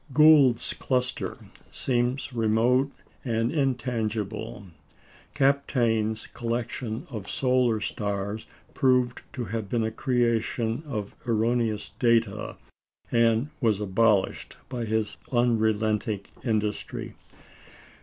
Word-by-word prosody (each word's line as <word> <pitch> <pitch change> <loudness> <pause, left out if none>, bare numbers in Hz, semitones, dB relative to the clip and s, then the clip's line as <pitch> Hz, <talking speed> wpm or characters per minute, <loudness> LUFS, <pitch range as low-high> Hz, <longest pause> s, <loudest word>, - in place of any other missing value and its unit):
Gould's 150 -6 +6
cluster 125 -1 -1 0.3
seems 125 +1 -1
remote 120 +4 +2 0.3
and 115 -1 0
intangible; 115 - -2 0.7
Kapteyn's 120 -6 +1
collection 120 -1 -4
of 105 -5 -6
solar 125 -4 +2
stars 100 0 -3 0.3
proved 125 -2 +2
to 125 - -3
have 110 0 -4
been 115 0 +1
a 110 - -1
creation 115 -1 0
of 105 -7 -4
erroneous 115 -1 0
data, 115 -4 +1 0.5
and 115 +3 +3
was 110 -6 +2
abolished 105 0 +1
by 125 -2 -3
his 110 -1 -1
unrelenting 110 -3 +1 0.2
industry. 110 -3 -2
115 Hz, 90 wpm, -26 LUFS, 110-125 Hz, 0.7 s, Gould's